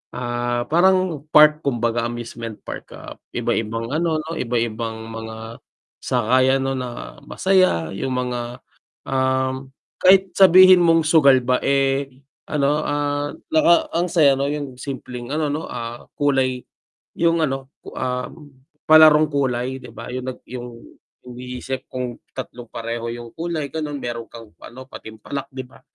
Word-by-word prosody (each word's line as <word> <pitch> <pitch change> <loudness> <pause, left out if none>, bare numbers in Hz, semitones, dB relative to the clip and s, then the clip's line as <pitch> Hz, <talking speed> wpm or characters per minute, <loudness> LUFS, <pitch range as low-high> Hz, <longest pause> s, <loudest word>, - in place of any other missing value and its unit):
ah, 120 0 -2
parang 175 -3 +2
park 150 0 +6
kumbaga 120 -4 -1
amusement 115 -2 -6
park, - - -8
ah, - - -11 0.2
iba-ibang 115 +2 -2
ano 160 +1 0
no, 160 - -7
iba 120 0 -2
ibang 115 -1 -3
mga 110 0 -8 0.4
sakayan 130 +2 +2
no 135 - -1
na 120 - -7
masaya 185 - +2
yung 130 +7 -3
mga, 125 -1 -4 0.5
um, 130 0 0 0.3
kahit 190 +1 +5
sabihin 185 0 +8
mong 165 -1 +4
sugal 140 -5 +5
ba 125 +1 +1
eh 135 0 +1 0.4
ano, 145 0 +1
ah, 145 -1 -2 0.2
naka 170 +2 +4
ang 175 +2 0
saya 145 -6 +4
no, 140 - 0
yung 140 -3 -5
simpleng 130 0 -6
ano 150 -2 0
no, 155 +3 -4
ah, 120 0 -7
kulay, 130 -3 +1 0.5
yung 165 -1 +2
ano, 135 0 -3 0.2
ah, 125 -1 -2 0.6
palarong 155 -1 +7
kulay, 130 -1 -1
di 125 - -11
ba, 115 - -9
yung 130 0 -4
nag 130 - -8
yung 120 -1 -8 0.5
iniisip 125 +1 -7
kung 125 -2 -5 0.2
tatlong 120 -1 -7
pareho 115 0 -4
yung 120 -1 -9
kulay 165 -3 -3
ganon 150 -2 -3
meron 115 -2 -5
kang 115 -2 -13
ano 130 +2 -10
patimpalak, 110 +4 -8
di 130 -1 -7
ba? 125 - -19
130 Hz, 140 wpm, -21 LUFS, 120-150 Hz, 0.6 s, sabihin